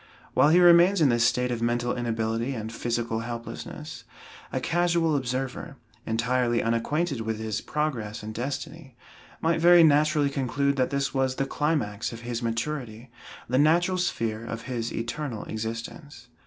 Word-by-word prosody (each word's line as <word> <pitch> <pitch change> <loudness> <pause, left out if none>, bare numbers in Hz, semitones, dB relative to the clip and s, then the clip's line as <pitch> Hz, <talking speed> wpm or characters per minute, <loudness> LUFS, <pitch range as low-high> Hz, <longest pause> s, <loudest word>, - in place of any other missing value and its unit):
While 145 - +5
he 170 +3 +6
remains 175 +2 +6
in 150 -4 +4
this 120 -1 +2
state 125 0 +1
of 120 -1 -3
mental 120 +1 0
inability 115 +1 -2
and 110 0 -5
physical 115 -1 -2
helplessness, 115 0 -7 0.5
a - - -1
casual 170 -2 +1
observer, 135 +3 -3 0.3
entirely 120 +1 +1
unacquainted 135 +5 0
with 110 0 -2
his 110 -1 -3
progress 120 -9 -3
and 110 +1 -6
destiny, 135 +3 -5 0.5
might 165 0 +1
very 175 0 +7
naturally 150 -1 +3
conclude 140 +1 0
that 130 -1 +2
this 140 -1 -1
was 130 -1 0
the 135 - -1
climax 135 -8 -1
of 115 -1 -9
his 120 0 -4
maturity, 115 0 -4 0.4
the 130 +2 +1
natural 175 +5 +3
sphere 115 -10 -2
of 115 0 -6
his 120 -3 -3
eternal 115 0 -4
existence. 115 +4 -6
125 Hz, 150 wpm, -26 LUFS, 115-150 Hz, 0.5 s, very